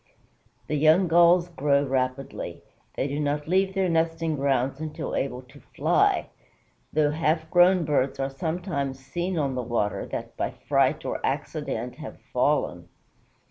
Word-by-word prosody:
The 150 Hz, -, -1 dB
young 160 Hz, +5 st, +5 dB
Gulls 170 Hz, +1 st, +5 dB
grow 145 Hz, -3 st, +2 dB
rapidly. 130 Hz, 0 st, -3 dB, 0.3 s
They 135 Hz, -, -1 dB
do 145 Hz, +1 st, -3 dB
not 150 Hz, 0 st, -1 dB
leave 190 Hz, +2 st, +1 dB
their 190 Hz, -1 st, +2 dB
nesting 165 Hz, -1 st, 0 dB
grounds 135 Hz, -1 st, 0 dB
until 155 Hz, -1 st, -4 dB
able 130 Hz, -1 st, -2 dB
to 140 Hz, +3 st, -17 dB, 0.2 s
fly, -, -, +2 dB, 0.6 s
though, 150 Hz, -1 st, +2 dB
half 160 Hz, +1 st, 0 dB
grown 175 Hz, 0 st, +5 dB
birds 140 Hz, -2 st, 0 dB
are 135 Hz, 0 st, -1 dB
sometimes 160 Hz, -3 st, -3 dB
seen 175 Hz, +7 st, -3 dB
on 140 Hz, -4 st, 0 dB
the 130 Hz, -, -2 dB
water 115 Hz, -4 st, -1 dB
that -, -, -6 dB
by -, -, -1 dB, 0.2 s
fright -, -, +2 dB
or -, -, -3 dB
accident -, -, -3 dB
have -, -, -9 dB
fallen. -, -, 0 dB
150 Hz, 145 wpm, -26 LUFS, 135-170 Hz, 0.6 s, young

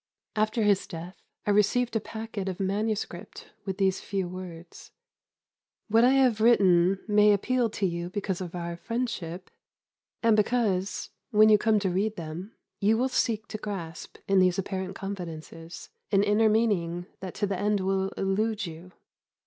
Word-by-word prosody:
After 215 Hz, +1 st, +1 dB
his 205 Hz, -2 st, +2 dB
death 170 Hz, +2 st, -8 dB, 0.3 s
I 210 Hz, -, +2 dB
received 225 Hz, +4 st, +2 dB
a -, -, +3 dB
packet 220 Hz, -2 st, -5 dB
of 185 Hz, -, -5 dB
manuscript 215 Hz, -, -3 dB
with 190 Hz, -2 st, -3 dB
these 190 Hz, -1 st, +1 dB
few 195 Hz, -3 st, -2 dB
words: 175 Hz, -2 st, -9 dB, 1.0 s
"What 225 Hz, +2 st, +5 dB
I 255 Hz, +2 st, +6 dB
have 255 Hz, -5 st, +3 dB
written 195 Hz, -5 st, +5 dB
may 210 Hz, 0 st, +5 dB
appeal 235 Hz, +4 st, +1 dB
to 205 Hz, -1 st, -2 dB
you 170 Hz, -1 st, -2 dB
because 190 Hz, -1 st, -3 dB
of 180 Hz, -1 st, -6 dB
our 170 Hz, -1 st, -4 dB
friendship, 195 Hz, -6 st, -4 dB, 0.7 s
and 225 Hz, -1 st, +5 dB
because, 205 Hz, -4 st, 0 dB, 0.2 s
when 215 Hz, 0 st, +6 dB
you 210 Hz, -1 st, +6 dB
come 220 Hz, -1 st, +3 dB
to 190 Hz, -2 st, 0 dB
read 205 Hz, +4 st, 0 dB
them, 170 Hz, +5 st, -7 dB, 0.2 s
you 215 Hz, +2 st, +3 dB
will 255 Hz, +3 st, +1 dB
seek 230 Hz, -3 st, 0 dB
to 215 Hz, -, -5 dB
grasp, 175 Hz, -7 st, -6 dB
in 195 Hz, -1 st, +4 dB
these 185 Hz, -1 st, +3 dB
apparent 190 Hz, -1 st, -3 dB
confidences, 170 Hz, -4 st, -7 dB, 0.2 s
an 195 Hz, -1 st, +4 dB
inner 210 Hz, +2 st, +3 dB
meaning 180 Hz, -6 st, +1 dB
that 185 Hz, -1 st, -7 dB
to 205 Hz, -, 0 dB
the 195 Hz, -2 st, -2 dB
end 205 Hz, 0 st, +1 dB
will 190 Hz, 0 st, 0 dB
elude 210 Hz, +2 st, 0 dB
you. 170 Hz, +2 st, -10 dB
200 Hz, 160 wpm, -27 LUFS, 180-220 Hz, 1.0 s, I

